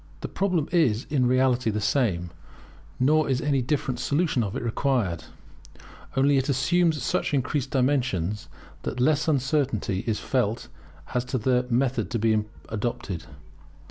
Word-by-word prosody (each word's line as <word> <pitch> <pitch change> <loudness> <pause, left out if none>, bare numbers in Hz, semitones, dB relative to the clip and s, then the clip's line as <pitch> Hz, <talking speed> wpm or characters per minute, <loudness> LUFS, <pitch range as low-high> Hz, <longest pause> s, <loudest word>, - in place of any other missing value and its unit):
The - - -3
problem 180 -6 0
is 130 -10 +2
in 130 -4 +2
reality 130 -1 +2
the 105 0 -1
same, 100 - 0 0.7
nor 155 +4 +3
is 130 -2 +1
any 140 -2 +1
different 130 -1 -1
solution 145 -3 +1
of 100 -2 -4
it - - -3
required; 115 - 0 0.9
only 140 +1 +4
it 135 - -2
assumes 155 +4 +2
such 145 - 0
increased 135 0 -1
dimensions, 125 - 0 0.3
that 125 - -4
less 150 +4 +2
uncertainty 130 -8 0
is 110 -2 0
felt 120 -4 -1 0.4
as 125 - +1
to 130 - -2
the 125 +1 +1
method 125 +2 +1
to 120 - -1
be 110 -1 +2 0.3
adopted. 105 -5 -3
130 Hz, 140 wpm, -26 LUFS, 115-140 Hz, 0.9 s, only